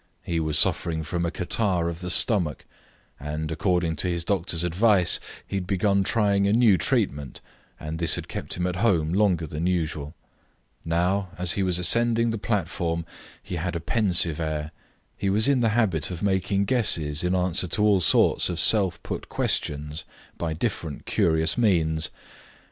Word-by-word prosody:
He 85 -1 -2
was 80 -2 -1
suffering 80 -1 +1
from 85 +2 -2
a - - -1
catarrh 90 0 -1
of 85 0 -5
the 90 - -5
stomach, 90 - +1 0.5
and, 75 +2 -5
according 85 -1 0
to 90 - 0
his 85 -1 -2
doctor's 85 -2 -1
advice, 90 +1 +3 0.3
he 100 - -4
had 90 -2 -4
begun 100 +1 +1
trying 100 -1 +1
a 100 - +2
new 115 -4 +5
treatment, 75 -4 -1 0.4
and 80 +1 -6
this 85 -2 +3
had - - -6
kept - - -5
him 90 - -2
at 90 0 -2
home 90 -7 +1
longer 95 -5 +2
than 75 +3 -3
usual. 80 -4 -2 0.7
Now, 90 +4 0
as 90 -1 +3
he 100 - -1
was 90 -2 +1
ascending 115 +5 +2
the 110 - -4
platform, 85 -5 -2 0.4
he 90 - -5
had 85 +1 -3
a - - -2
pensive 85 -4 +1
air. 75 -1 -3 0.4
He 100 - -2
was 105 +5 +3
in 140 -2 +3
the 115 -2 +2
habit 90 -10 0
of 90 +1 -6
making 100 0 0
guesses 85 - 0
in 90 +1 0
answer 90 0 0
to 105 +5 0
all 100 -3 +3
sorts 80 - +3
of 85 -1 -3
self 95 -6 +3
put - - -6
questions 75 +2 -1 0.3
by 80 -2 -3
different 85 -4 -4
curious 80 +6 +1
means. 80 -8 +1
90 Hz, 170 wpm, -24 LUFS, 80-100 Hz, 0.7 s, new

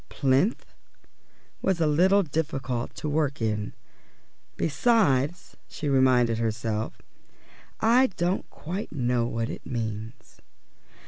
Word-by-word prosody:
"Plinth" 140 - +1 1.0
was 190 -3 +1
a 165 - +3
little 185 +7 +4
difficult 135 -6 -3
to - - -5
work 145 -2 0
in; 105 -2 -2 0.8
"besides," 165 - +1
she 150 - -5
reminded 130 -4 +3
herself, 110 -1 -2 0.8
"I 245 +4 +5
don't 175 +3 -1
quite 185 +7 -6
know 125 -4 0
what 115 -1 -2
it - - -8
means." 110 -1 -6
135 Hz, 105 wpm, -26 LUFS, 115-170 Hz, 1.0 s, I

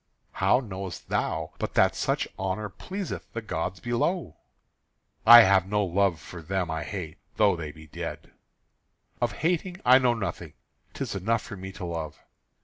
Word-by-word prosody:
"How 95 +6 +3
knowest 95 -5 -7
thou - - -1
but - - -4
that - - +4
such - - -1
honour 95 +3 -2
pleaseth 190 - -6
the 115 - -3
gods 90 -1 -3
below?" 120 - -1 0.9
"I 120 0 +12
have 95 -2 +4
no 105 0 +1
love 95 -2 +1
for 85 +1 -10
them 90 0 -2
I 80 0 -2
hate, 90 -5 -6 0.2
though 105 -3 +4
they 80 -3 -6
be 80 +1 -14
dead." 75 - -7 0.9
"Of 120 -3 +1
hating 180 +1 0
I 130 +1 +8
know 125 -2 +2
nothing: 110 -4 -5 0.4
'tis - - -3
enough 110 +4 0
for 105 - -8
me 95 0 -7
to 95 -1 -6
love." 80 -3 -5
95 Hz, 160 wpm, -27 LUFS, 90-120 Hz, 0.9 s, I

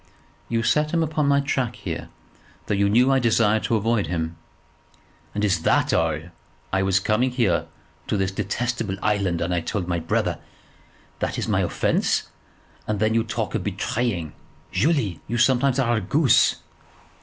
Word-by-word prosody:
"You 115 -1 0
set 150 +6 +1
him 165 - +3
upon 155 -2 0
my 140 0 +4
track 135 -3 -1
here, - - -6 0.6
though - - -1
you 100 0 +2
knew 125 +6 +4
I 135 - +4
desired 110 -2 +3
to 115 - +1
avoid 110 -3 +1
him." 80 -1 -3 1.0
"And 105 0 +1
is 95 -5 +1
that - - +2
all? 80 -2 +2 0.6
I 95 - +2
was 95 -1 +2
coming 110 +6 +1
here 115 -9 +1 0.4
to - - 0
this 95 -1 0
detestable 105 +1 -2
island, 100 -5 +1
and 85 +1 -1
I 90 - +1
told 90 +1 -3
my 85 -2 0
brother. 80 - -1 0.8
That - - -2
is - - -2
my - - +1
offence, - - 0 0.6
and 105 -1 -1
then 110 +1 +2
you 115 0 +2
talk 110 -1 -3
of 110 - -1
betraying! 105 -4 -2 0.4
Julie, 105 - +1
you 120 - -2
sometimes 130 +2 +3
are 120 -4 +2
a - - -1
goose." 135 - +3
110 Hz, 165 wpm, -23 LUFS, 95-125 Hz, 1.0 s, my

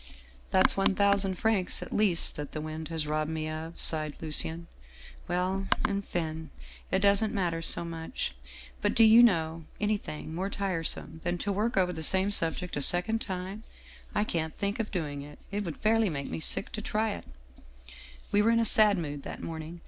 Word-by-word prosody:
" 65 -1 -22
' - - -27
That's 190 - +4
one 195 0 +2
thousand 200 -1 +3
francs, 210 -4 0
at - - -9
least, 200 -5 +3
that 145 -1 -6
the 155 - -4
wind 155 +1 -6
has 160 -2 -3
robbed 155 +1 -1
me 160 -1 -3
of,' 160 +2 -6
sighed 155 -2 +3
Lucien. 160 +2 0 0.3
' 65 0 -18
Well, 185 +2 -1 0.2
enfin, 165 -6 -4 0.4
that 190 - +1
doesn't 200 +2 +3
matter 170 -4 -1
so 170 - +2
much. 165 - -4 0.5
But - - 0
do 230 - +6
you 225 +2 +8
know 165 -7 +2
anything 205 -7 -3
more 185 +4 -2
tiresome 165 -5 -3
than 175 0 -1
to 200 +4 -2
work 210 +3 -1
over 180 -1 +2
the 160 - -6
same 190 +5 +6
subject 180 -1 0
a 145 - -2
second 180 +9 0
time? 190 +2 -5 0.5
I 210 - +2
can't 160 -6 -3
think 200 +2 -2
of 220 - -2
doing 150 -7 -4
it. 145 +1 -11
It 205 +1 -2
would 165 -4 -5
fairly 220 -1 +2
make 140 -4 -5
me - - -3
sick 160 - -1
to 215 - -5
try 215 +1 -1
it/ - - -7 0.6
" 60 0 -17
We 205 - +4
were 220 - +3
in 230 0 +3
a 230 - +2
sad 210 -2 +6
mood 145 -4 -4
that - - -8
morning. 160 +1 -7
175 Hz, 200 wpm, -29 LUFS, 155-200 Hz, 0.6 s, you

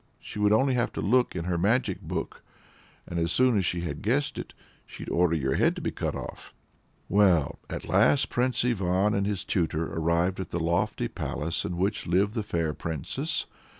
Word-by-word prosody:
She - - -8
would 105 0 +3
only 130 +5 +4
have 125 -1 +1
to - - -4
look 125 +3 +2
into 85 -1 -3
her 85 -1 0
magic 115 +8 +1
book, - - -4 0.7
and 85 - -3
as 85 0 0
soon 125 +5 +4
as 95 -4 +2
she 85 +1 -1
had 75 -4 -4
guessed 135 +7 0
it, - - -6 0.4
she'd - - -8
order 85 -1 +3
your 65 -4 0
head - - +2
to - - -6
be - - -1
cut - - -3
off." - - -8 0.5
Well, 95 -7 +3
at - - -5
last 110 +8 +3
Prince 125 0 +1
Ivan 100 -3 +1
and 100 0 +1
his 100 -2 -2
tutor 80 -3 -1
arrived 85 +3 +1
at 95 - -4
the 85 - -2
lofty 85 -6 0
palace 80 +4 -3
in 85 - -3
which 100 +4 -1
lived 95 +4 +2
the 115 - -1
fair 85 -6 -1
Princess. 80 -4 -3
95 Hz, 195 wpm, -27 LUFS, 85-105 Hz, 0.7 s, only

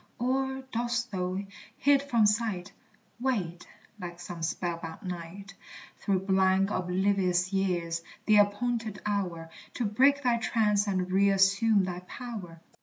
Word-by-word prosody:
Or 265 +2 -1
dost 240 +1 -1
thou, 185 -1 -2 0.4
hid 280 0 +4
from 235 -6 +2
sight, 210 -4 0 0.5
Wait, 195 -10 -2 0.3
like 175 -2 -7
some 175 -1 -7
spell 170 +1 -2
bound 165 +4 -8
knight, 180 +2 -7 0.4
Through 190 -2 0
blank, 190 0 +2
oblivious 185 0 +1
years 175 -4 0 0.2
the 215 -1 +5
appointed 215 +1 +1
hour 180 -6 -2 0.2
To 245 - -1
break 275 +7 +3
thy 245 -2 +3
trance 210 -3 +1
and 185 -2 -1
reassume 195 +2 +4
thy 180 -1 -3
power? 180 -4 -8
195 Hz, 125 wpm, -29 LUFS, 180-230 Hz, 0.5 s, the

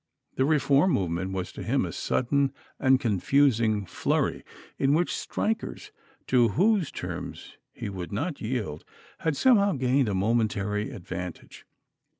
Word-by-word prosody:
The 130 - +2
reform 150 +3 +3
movement 95 0 -1
was 95 -1 -3
to - - -9
him - - +1
a - - -5
sudden 140 +2 0 0.3
and 130 -1 +4
confusing 110 -1 +2
flurry, - - -1 0.4
in 140 +1 +3
which 175 +2 +1
strikers, 225 - -3 0.3
to 125 -2 +4
whose 185 - +2
terms - - -7
he - - -6
would 95 -2 -6
not 145 - -3
yield, 110 - -3 0.4
had 160 -4 -1
somehow 205 -6 +4
gained 130 -2 +2
a 100 - -1
momentary 105 0 0
advantage. 90 -1 -8
125 Hz, 135 wpm, -27 LUFS, 100-145 Hz, 0.4 s, and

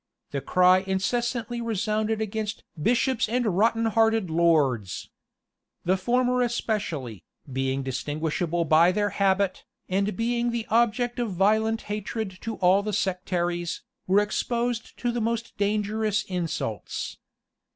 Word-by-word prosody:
The 140 - -2
cry 185 +3 +5
incessantly 235 +5 -1
resounded 220 0 -1
against 220 0 -3 0.2
"bishops 240 - +2
and 245 +1 +1
rotten 225 +3 +3
hearted 225 -4 +2
lords."[] 145 - +1 0.7
The 185 +2 +3
former 250 +5 +1
especially, 195 - -2 0.3
being 135 +1 -1
distinguishable 155 +6 -1
by 160 +3 +5
their 205 +1 0
habit, 195 -1 +1 0.2
and 195 +1 0
being 235 +1 0
the 235 -1 -2
object 240 +2 +2
of 230 -5 -1
violent 220 +4 +2
hatred 210 -1 -4
to 225 -1 -4
all 185 +2 +4
the 210 0 -3
sectaries, 175 -2 -1 0.2
were 195 +3 +5
exposed 235 +2 -2
to 245 - -1
the 235 0 -2
most 230 +1 -2
dangerous 210 +1 0
insults. 165 - -4
210 Hz, 120 wpm, -26 LUFS, 180-230 Hz, 0.7 s, cry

